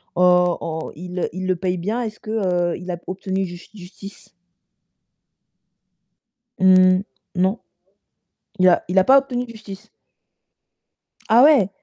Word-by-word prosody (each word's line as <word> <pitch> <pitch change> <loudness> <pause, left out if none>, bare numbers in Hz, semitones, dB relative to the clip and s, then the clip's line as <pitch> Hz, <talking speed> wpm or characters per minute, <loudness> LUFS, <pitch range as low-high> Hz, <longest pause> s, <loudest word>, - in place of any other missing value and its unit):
on 180 -1 +3
on 160 -1 -5
il 180 +2 -5
il 185 +1 -5
le 185 - +1
paye 180 +1 -3
bien, 215 +8 -3
est-ce 215 -1 -7
que, 215 - -12
heu, 180 -5 -1
il 180 +1 -10
a 175 - -4
obtenu 190 +1 -3
jus 175 0 -11
justice? 195 +1 -13 2.3
Mmh, 185 0 +5 0.3
non. 190 +5 0 1.0
Il 185 - +5
a 175 - +2
il 180 - -2
a - - +3
pas 270 +6 +6
obtenu 250 -2 -1
justice? 215 -1 -12 1.4
Ah 230 +3 +6
ouais? 275 -10 +5
185 Hz, 130 wpm, -20 LUFS, 180-215 Hz, 2.3 s, pas